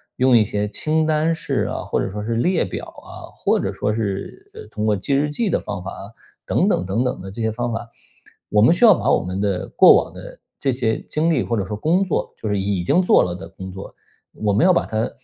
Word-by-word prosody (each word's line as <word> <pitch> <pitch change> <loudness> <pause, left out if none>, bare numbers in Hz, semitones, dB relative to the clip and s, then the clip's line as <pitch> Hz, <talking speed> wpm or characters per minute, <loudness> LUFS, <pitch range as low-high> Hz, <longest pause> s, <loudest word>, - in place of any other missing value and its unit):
用 130 -1 +4
一 115 - +6
些 105 0 -2
清 155 +9 0
单 155 +1 +1
式 160 - -2
啊， - - -4
或 - - -1
者 - - -2
说 105 +2 -5
是 115 +2 -2
列 175 - +1
表 95 - -6
啊， - - -12
或 - - +1
者 - - -2
说 105 - -2
是 110 - -4
呃， 445 - -9
通 105 - -3
过 105 - +3
记 120 +9 -2
日 145 +2 +2
记 205 +8 -1
的 - - +1
方 90 - -6
法 95 - -6
啊， 100 - -9 0.4
等 - - +2
等 - - +1
等 95 +6 -1
等 125 - -2
的 95 - -8
这 110 +5 -7
些 110 - +1
方 120 +2 -3
法。 115 +1 -4 0.6
我 105 - +3
们 120 +9 +6
需 210 +7 +4
要 215 - +9
把 - - 0
我 - - +3
们 90 +2 -4
的 100 -3 -1
过 - - +7
往 - - -13
的 - - -11 0.2
这 135 - 0
些 120 -3 -1
经 155 +2 +1
历 145 -6 +1
或 115 - -2
者 100 - -1
说 105 - -4
工 165 - +1
作， 185 - -2
就 - - -6
是 100 -1 0
已 95 -2 -1
经 175 - +3
做 180 - +4
了 90 -1 -3
的 90 - -9
工 95 0 -9
作， 95 +1 -9 0.4
我 105 -2 -1
们 105 - +3
要 185 - +6
把 175 - +2
它 110 +1 -2
110 Hz, 280 characters per minute, -21 LUFS, 100-155 Hz, 0.6 s, 要